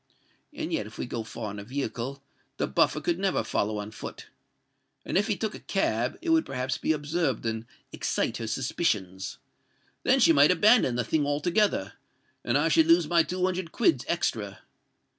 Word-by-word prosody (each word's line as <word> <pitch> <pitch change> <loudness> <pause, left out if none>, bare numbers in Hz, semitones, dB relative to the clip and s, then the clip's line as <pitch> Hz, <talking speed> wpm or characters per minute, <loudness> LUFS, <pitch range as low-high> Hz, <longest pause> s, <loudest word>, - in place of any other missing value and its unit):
And - - -5
yet 105 - -1
if 110 - -13
we - - -3
go 120 -1 -4
far 110 -1 -6
in 105 - -7
a - - -7
vehicle, 135 +2 -4 0.3
the - - 0
Buffer - - +2
never 195 - 0
could - - -12
follow 105 +1 0
on 105 +1 -5
foot; 110 - -9 0.8
and - - -3
if 205 +3 +3
he 210 -4 0
took 220 -1 -2
a - - -8
cab, 120 - -1
it 335 - 0
would 325 -1 +4
perhaps 130 0 -3
be - - +1
observed 150 -4 -1
and 110 0 -3 0.3
excite - - -1
her 115 - -5
suspicions. 105 - -2 0.6
Then 265 +1 +3
she 165 - +6
might 145 0 +6
abandon 180 - +4
the 120 - 0
thing 150 +1 0
altogether; 150 - +1 0.5
and 120 +3 +2
I 150 +3 +2
should 160 0 +4
lose 165 -1 +5
my 170 +1 +4
two 180 +2 -1
hundred 185 -2 -2
quids 325 +8 +2
extra. - - -2
145 Hz, 185 wpm, -27 LUFS, 115-180 Hz, 0.8 s, she